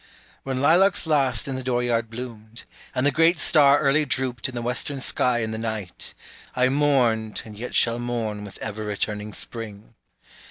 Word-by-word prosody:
When 130 -1 -3
lilacs 175 +7 +4
last 140 -5 +1
in 135 - -3
the 130 - -4
door 125 -1 0
yard 115 -2 0
bloomed, 115 -1 -9 0.3
And 125 - +1
the 145 - +4
great 165 +4 +4
star 145 -2 +5
early 145 +1 +3
drooped 130 -3 -2
in 125 - -9
the 120 - -3
western 125 +3 -2
sky 125 -2 +1
in 110 - -3
the 110 - -4
night, 110 -5 -4 0.4
I 125 0 +3
mourned 125 -6 +1
and 110 -1 -10
yet 120 +4 -6
shall 115 0 +3
mourn 115 -4 -3
with 100 - -10
ever 110 0 -4
returning 105 0 -3
spring. 110 -1 -8
120 Hz, 175 wpm, -24 LUFS, 110-135 Hz, 0.4 s, star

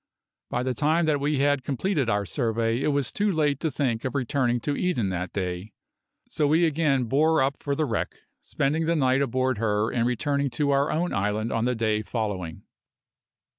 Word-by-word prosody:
By 125 - -1
the 130 0 -1
time 160 +4 +2
that 150 -2 +1
we 145 +1 0
had 140 -1 +2
completed 140 - -1
our 105 -1 +1
survey 115 +5 0
it - - 0
was 140 -5 0
too 205 0 +1
late 150 -5 +1
to 160 - -1
think 125 -5 -1
of 130 - -3
returning 125 -2 0
to 145 +3 -1
Eden 140 - 0
that 90 0 -3
day, 95 +1 -4 0.5
so 150 - 0
we 160 +4 +4
again 150 -4 +1
bore 155 +7 +2
up 135 +1 -2
for 140 -1 -1
the 155 - 0
wreck, 115 -6 -2 0.3
spending 155 +4 -1
that 170 - +2
night 130 -2 +2
aboard 130 -3 0
her 105 -1 +1
and 115 0 +1
returning 140 +3 0
to 140 +4 0
our 140 +1 +2
own 175 +3 -1
island 105 +3 -1
on 115 0 0
the 125 0 +1
day 110 -1 0
following. 100 -6 -4
130 Hz, 195 wpm, -26 LUFS, 115-145 Hz, 0.5 s, we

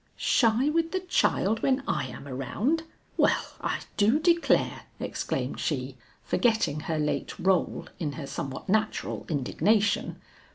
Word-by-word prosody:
"Shy 235 +2 +3
with 330 +2 +1
the 375 - 0
child 225 - +1
when 265 0 +2
I 130 - 0
am 125 +3 -9
around! 215 - -1 0.3
well - - +2
I - - -1 0.2
do 220 +6 +4
declare!" 335 +1 +2
exclaimed - - -3
she, - - -2 0.3
forgetting 220 - +1
her 160 +1 -2
late 150 -1 -1
rôle 185 -1 +1
in 150 -4 -2
her 150 -2 -6
somewhat 135 -1 -5
natural 215 +2 -1
indignation. 200 - +1
215 Hz, 130 wpm, -27 LUFS, -, 0.3 s, do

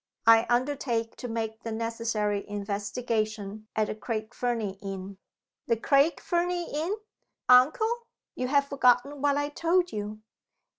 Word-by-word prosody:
I 230 +1 +7
undertake 240 -2 0
to 245 - -5
make 225 -1 -3
the 230 - -5
necessary 225 -2 -1
investigation 210 +1 -3
at 215 - +2
the - - -3
Craig 215 0 -4
Fernie 225 -6 -2
inn." 195 -1 -6 0.5
"The 230 - +2
Craig 280 +7 +3
Fernie 350 -1 -1
inn? 325 +7 -1 0.5
Uncle! 440 - +4 0.3
you 255 - -2
have 280 +1 +3
forgotten 275 +1 +2
what 285 0 +3
I 290 0 0
told 350 +4 +1
you." 210 +1 -5
230 Hz, 135 wpm, -28 LUFS, 215-285 Hz, 0.5 s, I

